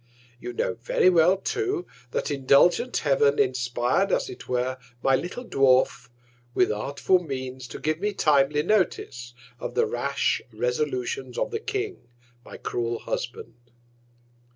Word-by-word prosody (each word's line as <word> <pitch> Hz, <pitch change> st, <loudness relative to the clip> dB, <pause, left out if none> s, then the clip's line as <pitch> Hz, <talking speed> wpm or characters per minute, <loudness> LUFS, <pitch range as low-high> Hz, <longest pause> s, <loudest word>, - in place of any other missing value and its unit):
You 120 Hz, -, -6 dB
know 115 Hz, -, -1 dB
very 120 Hz, +10 st, +2 dB
well 175 Hz, +2 st, +5 dB
too, 385 Hz, -, -2 dB, 0.2 s
that 125 Hz, -, -2 dB
indulgent 145 Hz, -, +3 dB
Heav'n 140 Hz, -1 st, +3 dB
inspir'd, 125 Hz, +8 st, +1 dB
as -, -, 0 dB
it -, -, -11 dB
were, 125 Hz, +1 st, -1 dB, 0.2 s
my 135 Hz, -, +4 dB
little 180 Hz, -, -4 dB
Dwarf, 130 Hz, -, +2 dB, 0.5 s
with -, -, +3 dB
artful 140 Hz, -, +1 dB
Means 130 Hz, -3 st, -5 dB
to 115 Hz, -, -8 dB
give 155 Hz, +1 st, -1 dB
me 210 Hz, +2 st, 0 dB
timely 150 Hz, -4 st, +3 dB
Notice 150 Hz, -, -1 dB, 0.2 s
of -, -, -5 dB
the 465 Hz, +1 st, +3 dB
rash 445 Hz, -, 0 dB
Resolutions 450 Hz, -2 st, -2 dB
of -, -, -1 dB
the 440 Hz, -, -2 dB
King, 415 Hz, -3 st, -4 dB, 0.4 s
my -, -, -10 dB
cruel 120 Hz, -1 st, -2 dB
Husband. 120 Hz, 0 st, -5 dB
145 Hz, 135 wpm, -25 LUFS, -, 0.5 s, well